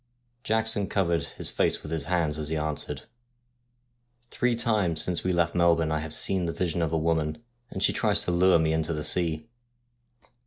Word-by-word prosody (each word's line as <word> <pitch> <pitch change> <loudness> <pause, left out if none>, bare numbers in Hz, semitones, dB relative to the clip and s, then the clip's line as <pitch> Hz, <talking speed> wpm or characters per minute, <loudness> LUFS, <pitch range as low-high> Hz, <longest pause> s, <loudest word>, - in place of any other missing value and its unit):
Jackson 110 -2 +1
covered 85 -5 0
his - - -5
face - - 0
with 75 - -8
his 80 -2 -2
hands 80 -4 0
as 75 -1 -3
he 80 - -1
answered: 75 -2 -4 0.6
' 120 0 -45
Three 125 -1 +1
times 105 -9 +1
since 90 -2 -2
we 95 - +1
left 85 -1 +1
Melbourne 85 -2 +3
I 80 - 0
have 80 0 -6
seen 95 -3 0
the - - -1
vision 85 -1 -1
of 80 -2 0
a 80 - +1
woman, 80 +4 -1 0.3
and - - -4
she - - +3
tries - - +2
to - - -1
lure 90 +1 +4
me 80 -1 +1
into 80 +1 -1
the 75 -1 -3
sea.' 85 +3 +1
85 Hz, 195 wpm, -27 LUFS, 80-100 Hz, 0.6 s, lure